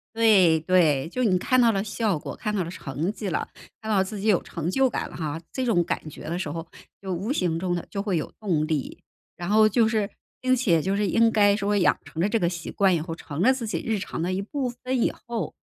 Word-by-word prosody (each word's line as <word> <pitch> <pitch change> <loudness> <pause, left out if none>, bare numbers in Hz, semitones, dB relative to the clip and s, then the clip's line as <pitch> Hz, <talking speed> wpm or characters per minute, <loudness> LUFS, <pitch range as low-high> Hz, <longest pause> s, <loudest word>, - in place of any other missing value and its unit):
对 195 -8 +5
对， 160 -5 +3
就 255 +9 -2
你 195 -6 +3
看 255 +7 +2
到 235 -1 +5
了 195 -2 0
效 215 -4 -1
果， - - -7
看 210 -1 -3
到 190 -4 0
了 165 - -6
成 155 +2 -3
绩 215 -2 -5
了， 170 - -2 0.3
看 220 - -8
到 195 -3 +4
自 200 +2 -5
己 200 - -4
有 205 -5 +3
成 165 0 -5
就 265 +5 +2
感 - - -3
了 - - -11
哈， 160 -1 -3
这 260 - -2
种 190 -8 +2
感 160 -2 -3
觉 - - -11
的 165 +2 -3
时 185 - -3
候， 165 0 -5 0.3
就 190 -1 -4
无 195 +9 -2
形 175 - 0
中 180 -1 -1
地 175 - -5
就 200 - -3
会 200 -4 -1
有 155 - -2
动 170 -8 0
力。 155 -4 -3 0.4
然 175 +1 -5
后 215 +1 +5
就 220 +1 +3
是 215 -3 0 0.3
并 255 0 +3
且 195 - +2
就 195 +3 0
是 205 0 +1
应 230 +4 +4
该 205 -2 +4
说 205 0 0
养 195 - +3
成 160 - -7
了 185 - +2
这 225 +2 +1
个 170 - +2
习 170 -1 -5
惯 195 -2 +3
以 165 - 0
后， 165 +1 -5
成 155 -2 -7
了 250 +8 +5
自 250 -3 -4
己 - - -2
日 220 -2 0
常 - - -5
的 175 +3 -1
一 190 +1 -1
部 260 +5 -3
分 250 +1 -3
以 - - +2
后， 230 -8 -3
195 Hz, 285 characters per minute, -25 LUFS, 170-220 Hz, 0.4 s, 对